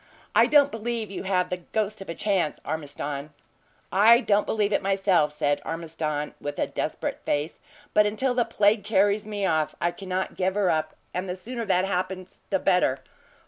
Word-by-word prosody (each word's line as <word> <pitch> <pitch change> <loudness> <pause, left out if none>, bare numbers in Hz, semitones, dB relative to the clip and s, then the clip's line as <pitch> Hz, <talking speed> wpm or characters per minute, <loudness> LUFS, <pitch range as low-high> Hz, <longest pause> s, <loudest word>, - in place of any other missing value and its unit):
I - - +6
don't 285 -1 +5
believe 225 -2 -3
you 195 - -5
have 185 -2 +1
the 180 - 0
ghost 210 +3 -3
of 195 - -9
a 170 - -4
chance, 190 -7 0
Ormiston." 145 -1 -5 0.6
"I 220 +5 +7
don't 210 -4 +2
believe 210 -1 +1
it - - +2
myself," 195 -5 +2
said 145 -1 0
Ormiston, 160 -2 -3
with 145 0 -4
a - - +1
desperate - - -3
face 145 +3 -2 0.3
"but 210 0 +5
until 250 +5 0
the 245 -1 +2
plague 215 -2 +2
carries 205 0 +2
me 205 -2 -2
off 155 -4 +1
I 175 - +1
cannot 185 0 -4
give 190 +1 0
her 200 -4 +2
up; 155 -1 -1 0.2
and 185 +1 -3
the 180 - -2
sooner 230 +5 -5
that 185 -2 +2
happens, 185 -1 -3
the 195 - +2
better. 180 -8 +2
190 Hz, 185 wpm, -26 LUFS, 165-210 Hz, 0.6 s, I